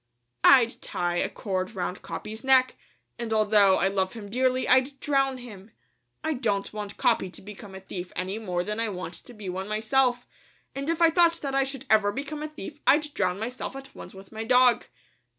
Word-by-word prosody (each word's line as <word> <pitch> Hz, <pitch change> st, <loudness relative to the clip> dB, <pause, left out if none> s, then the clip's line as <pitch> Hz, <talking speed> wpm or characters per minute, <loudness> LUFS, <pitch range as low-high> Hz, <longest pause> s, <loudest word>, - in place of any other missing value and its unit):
"I'd 250 Hz, -4 st, +6 dB
tie 175 Hz, 0 st, -2 dB
a -, -, 0 dB
cord 190 Hz, +1 st, -3 dB
round 180 Hz, 0 st, -3 dB
Capi's 220 Hz, +1 st, -7 dB
neck, 260 Hz, -1 st, +4 dB, 0.4 s
and 235 Hz, -2 st, -4 dB
although 210 Hz, -3 st, +4 dB
I 195 Hz, -, +2 dB
love 190 Hz, -1 st, -1 dB
him 205 Hz, -3 st, -9 dB
dearly, 255 Hz, +2 st, +1 dB
I'd 260 Hz, +2 st, +3 dB
drown 270 Hz, -2 st, +1 dB
him. 215 Hz, -5 st, -11 dB, 0.5 s
I 315 Hz, 0 st, 0 dB
don't 210 Hz, -8 st, -1 dB
want 210 Hz, -1 st, -6 dB
Capi 235 Hz, -7 st, +2 dB
to -, -, -13 dB
become 200 Hz, 0 st, -11 dB
a 190 Hz, -, -8 dB
thief 180 Hz, -1 st, -7 dB
any 190 Hz, +4 st, -3 dB
more 180 Hz, -5 st, -2 dB
than 210 Hz, +3 st, -3 dB
I 230 Hz, -1 st, 0 dB
want 185 Hz, -2 st, -6 dB
to 245 Hz, -, -12 dB
be 210 Hz, -2 st, -9 dB
one 190 Hz, +2 st, -4 dB
myself, 245 Hz, +4 st, +1 dB, 0.5 s
and 275 Hz, +3 st, -4 dB
if 335 Hz, 0 st, +1 dB
I 330 Hz, -, +6 dB
thought 340 Hz, 0 st, +4 dB
that 275 Hz, -2 st, -3 dB
I 275 Hz, -, +2 dB, 0.3 s
ever 215 Hz, -2 st, +5 dB
should 205 Hz, -, -5 dB
become 295 Hz, +2 st, -4 dB
a 305 Hz, -, -3 dB
thief, 305 Hz, 0 st, -9 dB
I'd 295 Hz, 0 st, +4 dB
drown 185 Hz, -2 st, 0 dB
myself 245 Hz, +5 st, -5 dB
at 270 Hz, 0 st, -10 dB
once -, -, -11 dB
with 190 Hz, 0 st, -13 dB
my 220 Hz, 0 st, -5 dB
dog." 250 Hz, 0 st, +4 dB
225 Hz, 205 wpm, -26 LUFS, 195-265 Hz, 0.5 s, I'd